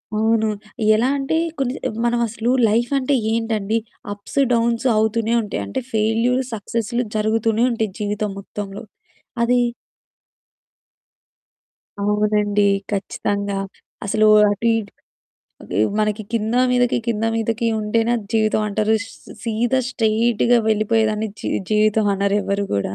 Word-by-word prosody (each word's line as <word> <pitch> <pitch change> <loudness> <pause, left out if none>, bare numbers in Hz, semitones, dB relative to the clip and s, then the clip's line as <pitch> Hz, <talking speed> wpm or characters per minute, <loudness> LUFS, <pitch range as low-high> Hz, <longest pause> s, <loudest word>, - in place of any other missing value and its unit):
అవును. 220 +1 +2 0.5
ఎలా 230 +4 +2
అంటే 275 +3 -1 0.2
కొన్ని 260 -2 0
స - - -2 0.2
మనమసలు 235 0 0 0.2
లైఫంటే 255 +5 +1 0.2
ఏంటండి, 225 -2 -1 0.4
అప్స్, 205 +7 -5
డౌన్సు 235 +2 +1
అవుతూనే 220 +1 +1
ఉంటాయి. 205 - -4
అంటే 100 - -3
ఫెయిల్యూర్ 225 +4 +2
సక్సెస్లు 230 +2 -2
జరుగుతూనే 220 +2 +1
ఉంటాయి 220 -3 -1
జీవితం 210 0 -2
మొత్తంలో. 200 +1 -7 0.6
అది 245 +1 +3 2.4
అవునండి, 210 0 +1 0.3
ఖచ్చితంగా. 200 0 -2 0.5
అసలు 215 +2 +3 0.2
అటు 210 +3 -1
ఇటు 205 -3 -5 0.7
అవి 95 - -2 0.2
మనకి 215 0 0
కిందా 230 +2 +1
మీదకి, 245 -1 +2
కిందా 225 -1 0
మీదకి 225 +1 -1
ఉంటేనే 225 +2 0
అది 215 -3 -7
జీవితం 215 -1 +2
అంటారు. 215 +2 +1
స్ - - -13 0.3
సీదా 235 +3 0
స్ట్రెయిట్‌గా 235 0 +2
వెళ్ళిపోయేదాన్ని 220 0 +1
జీ - - -3 0.2
జీవితమనరు 205 -2 +2
ఎవరు 200 0 -1
గూడా. 100 -1 -1
220 Hz, 110 wpm, -20 LUFS, 210-230 Hz, 2.4 s, అది